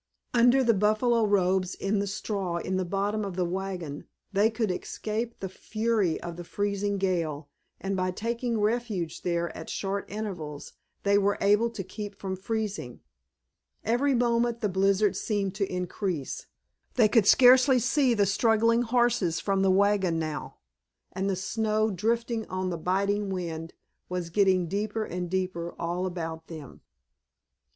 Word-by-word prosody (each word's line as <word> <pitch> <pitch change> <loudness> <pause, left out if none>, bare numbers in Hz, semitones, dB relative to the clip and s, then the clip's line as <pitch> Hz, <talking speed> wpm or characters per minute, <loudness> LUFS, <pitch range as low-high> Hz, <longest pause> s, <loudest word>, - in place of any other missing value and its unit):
Under 245 +2 +5
the 230 -2 +4
buffalo 215 +3 +2
robes 185 -2 +2
in 200 +1 0
the 200 - -1
straw 195 -3 -2
in 185 +2 -2
the 185 - 0
bottom 200 +3 -1
of 195 -3 -4
the 180 -1 0
wagon 180 -5 -4 0.3
they 205 +3 +4
could 220 -3 -1
escape 220 +5 -4
the 195 - -3
fury 215 -2 -1
of 170 -1 -6
the 175 - -6
freezing 200 +2 -1
gale, 165 -6 -1 0.3
and 195 0 -2
by 185 0 0
taking 230 +4 -2
refuge 210 -6 -1
there 170 -1 -1
at 160 - -8
short 200 0 -3
intervals 180 -9 -6 0.3
they 200 0 +4
were 205 0 +1
able 210 +4 +3
to 220 -4 -6
keep 205 +2 -7
from 190 -2 -4
freezing. 205 - -4 0.8
Every 255 +5 +2
moment 235 -1 +1
the 210 - +1
blizzard 195 +2 +2
seemed 200 -3 -1
to 195 -1 -2
increase. 180 -4 -3 0.5
They 230 -4 +5
could 215 -1 +3
scarcely 255 +2 +7
see 250 +1 +2
the 205 -2 +3
struggling 225 +3 +3
horses 240 -8 +2
from 195 -1 0
the 195 - +3
wagon 190 -3 +3
now, 155 -2 -4 0.6
and 190 +2 -2
the 195 - +1
snow, 215 +3 0
drifting 230 +3 -1
on 185 0 -2
the 170 - -2
biting 200 +3 0
wind, 165 -3 -4 0.4
was 180 -2 -3
growing 190 -1 +3
deeper 215 +4 -2
and 180 -1 -4
deeper 180 -2 -2
all 175 +2 -1
about 165 -2 -5
them. 155 -5 -10
200 Hz, 155 wpm, -28 LUFS, 180-220 Hz, 0.8 s, scarcely